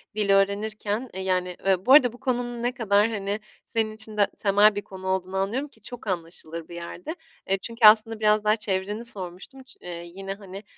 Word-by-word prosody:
dil 210 -2 0
öğrenirken, 205 +4 +1
eee, 190 - -5
yani 180 -1 -1 0.3
bu 260 - +6
arada 250 -5 +7
bu 245 - -14
konunun 240 -2 -2
ne 245 - +1
kadar 215 -3 +2
hani 205 -1 -3 0.3
senin 225 -2 -1
de - - -9
için 220 0 -3 0.2
temel 205 +1 +4
bir 205 - -2
konu 190 -1 -9
olduğunu 190 0 -1
anlıyorum, 230 +9 -1
ki 220 -6 -26
çok 240 0 -7
anlaşılır 165 -2 -5
bir 170 - -10
yerde, 175 - -7 0.3
eee, 195 - +3
çünkü 230 +1 0
aslında 220 +1 +5
biraz 215 -1 +3
daha 215 0 +4
çevreni 205 +1 -2
sormuştum, 195 +5 -5
ç 255 0 -20
eee, 170 -1 -7
yine 195 0 -5
hani, 195 0 -10
205 Hz, 195 wpm, -25 LUFS, 190-225 Hz, 0.3 s, arada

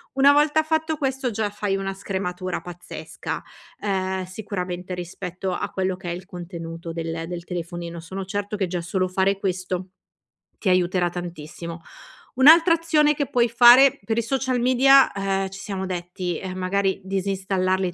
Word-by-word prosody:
Una 275 +1 +7
volta 300 +2 +3
fatto 315 0 0
questo 270 -3 -1
già 215 -1 -1
fai 205 -1 -2
una 195 0 -3
scrematura 185 -2 -4
pazzesca, 175 0 -7 0.4
uhm, 190 -2 -1
sicuramente 185 -2 -5
rispetto 180 +1 -5
a 180 - -3
quello 185 -1 -1
che 180 -2 -6
è - - -1
il 180 +1 -7
contenuto 170 -2 -7
del 165 0 -4
del 175 -1 -5
telefonino. 170 -1 -5
Sono 190 +4 -6
certo 205 +2 -3
che 195 -3 -1
già 175 0 -3
solo 185 +2 -1
fare 190 +1 +1
questo 185 -1 -3 0.7
ti 195 - -1
aiuterà 180 -1 +2
tantissimo. 170 -1 -7 0.5
Un'altra 325 +6 +7
azione 310 -3 +3
che 285 -2 -2
puoi 240 -1 +3
fare 245 +3 +7
per 225 +2 -2
i - - +3
social 260 +1 -1
media, 260 +2 +6
uhm, 195 -1 0
ci 195 +1 -10
siamo 190 -2 -4
detti, 180 -1 -4
uhm, 185 0 -5
magari 190 +1 0
disinstallarli 190 -1 0
190 Hz, 155 wpm, -23 LUFS, 180-225 Hz, 0.7 s, Una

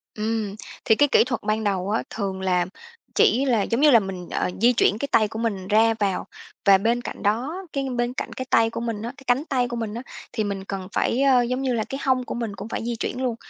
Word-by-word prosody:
Ừm, 215 -2 -2 0.3
thì 220 - +5
cái 290 +5 +4
kỹ - - +6
thuật 245 -1 -3
ban 215 +1 -1
đầu 195 -2 -1
á, 220 - 0
thường 195 -3 -4
là 180 -2 +1 0.5
chỉ 265 +4 +4
là 240 -6 +2
giống 230 +5 -1
như 300 -1 +7
là 235 - +8
mình, 190 -3 -6
ờ, - - -1
di 240 +2 +5
chuyển 210 -3 +3
cái 280 - -2
tay 215 - +4
của 220 +1 -7
mình 200 -5 -2
ra 225 +2 +4
vào. 200 -3 0 0.4
Và 195 -1 +7
bên 230 +5 +1
cạnh - - -7
đó, 260 - -1
cái 275 -1 -2
bên 240 +1 -1
cạnh - - -5
cái 260 - -5
tay 225 0 +4
của - - -5
mình 230 -3 -3
á, 235 +3 -5
cái 275 - -14
cánh 250 +5 +2
tay 255 -5 0
của 240 - -5
mình 225 -3 -3
á 235 - -5 0.3
thì 220 - -1
mình 200 -2 -3
cần 195 -2 -5
phải, 250 - +1
ờ, 265 -3 +5
giống 250 +2 -1
như 260 -2 0
là, 225 -2 0
cái 270 - -4
hông 260 -1 +2
của - - -5
mình 230 -4 -4
cũng 205 - -7
phải - - -3
di 240 0 -2
chuyển 245 +2 -3
luôn, 245 -3 0
225 Hz, 265 wpm, -24 LUFS, 205-250 Hz, 0.5 s, là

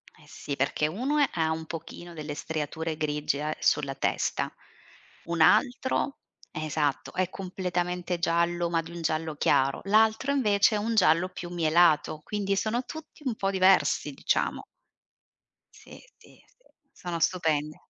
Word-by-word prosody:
Eh 150 - -20
sì, 145 -2 -6
perché 140 +2 0
uno 275 - +1
ha 160 -2 +1
un 160 0 -3
pochino 170 +1 -8
delle 150 -2 -6
striature 160 +1 -3
grigie 150 -2 -1
a 155 0 -2
sulla 140 -2 +1
testa, - - -1 0.7
un 170 -1 -1
altro, 255 - +3 0.3
esatto, 155 -2 -2
è 185 -1 0
completamente 180 -2 -3
giallo 170 +1 +1
ma 165 -1 +1
di 165 - -11
un 170 -1 -7
giallo 155 -1 -1
chiaro. 135 -1 +2
L'altro 220 +6 +3
invece 215 -6 +3
è - - +1
un 225 +2 -1
giallo 185 -2 +4
più 175 -1 -8
mielato, 160 -2 +3
quindi 200 -2 -1
sono 225 +5 -1
tutti 315 -1 -10
un 245 -4 -1
po' 195 -2 -1
diversi 190 0 +3
diciamo. - - -1 1.1
Sì, - - -14 0.2
sì, - - -20
sì, - - -33
sono 175 -2 -5
stupendi. 155 -3 0
170 Hz, 145 wpm, -27 LUFS, 155-200 Hz, 1.1 s, giallo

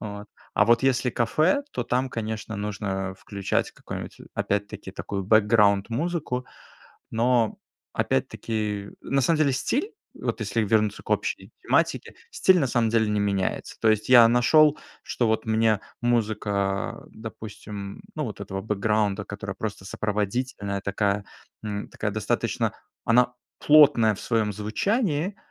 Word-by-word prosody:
Вот. 105 -1 -7 0.3
А 105 - +5
вот 120 +2 +4
если 125 -2 +2
кафе, 155 - +2
то - - -2
там, 130 +2 0
конечно, 110 -1 -4
нужно 95 -2 -3
включать 100 -2 -2
какую-нибудь - - -8 0.2
опять-таки 100 -1 -2
такую 100 0 -4
бэкграунд 105 -1 +4
музыку. 140 -2 -2 0.6
Но, 115 0 +2 0.3
опять-таки, 105 - -2
на 135 0 +1
самом 160 +5 +2
деле, 145 -3 +3
стиль, 255 - -1 0.2
вот - - -3
если 110 +2 0
вернуться 105 0 +1
к - - -15
общей - - -1
тематике, - - +1 0.2
стиль, 185 -1 +4
на 140 - +2
самом 115 -2 +1
деле, 110 -2 +2
не 105 0 0
меняется. 100 -2 -1
То 110 - +3
есть, 110 +1 0
я 120 -2 +9
нашел, 150 +5 +5 0.2
что 120 - -1
вот 110 0 0
мне 110 -1 +2 0.2
музыка, 115 -3 0 0.5
а, - - -16
допустим, 105 - -8
ну 155 -2 -2
вот 105 -3 -6
этого 95 -1 -4
бэкграунда, 105 -1 0
которая 100 -1 -6
просто 100 -3 -5
сопроводительная, 105 0 -2
такая, 100 0 0 0.4
эм, 105 -1 -4
такая 105 - -3
достаточно 110 -1 -1 0.3
Она 125 +1 +4 0.3
плотная 145 -8 +6
в - - -10
своем 110 -3 0
звучании, 170 - -1
110 Hz, 140 wpm, -25 LUFS, 100-125 Hz, 0.6 s, я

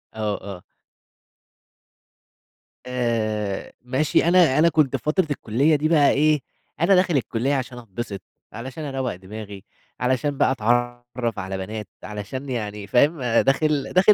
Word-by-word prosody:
آه، 105 -2 -1 0.2
آه. - - -18 2.2
آآ 110 -5 -2
ماشي، 130 +4 +1
أنا 170 -6 +5
أنا 165 +2 +6
كنت 150 -4 +2
في 125 - -4
فترة 160 +3 +1
الكُلّية 140 +5 +2
دي 150 +1 +1
بقى 150 -4 +5
إيه، 150 +1 +3 0.4
أنا 185 +4 +5
داخل 180 -5 +3
الكُلّية 125 +2 -1
عشان 130 -2 -4
أتبسط، 110 -3 -6 0.3
علشان 130 +7 -7
أروّق 135 -6 -3
دماغي، 100 +1 -9 0.4
علشان 130 +3 0
بقى - - +3
أتعرّف 120 -1 -1
على 95 -1 -4
بنات، 105 +3 -5 0.2
علشان 105 +6 -6
يعني 105 -4 -4
فاهم؟ 145 +5 +3
داخل 135 +4 +2
داخل 195 +3 +6
125 Hz, 130 wpm, -23 LUFS, 110-145 Hz, 2.2 s, أنا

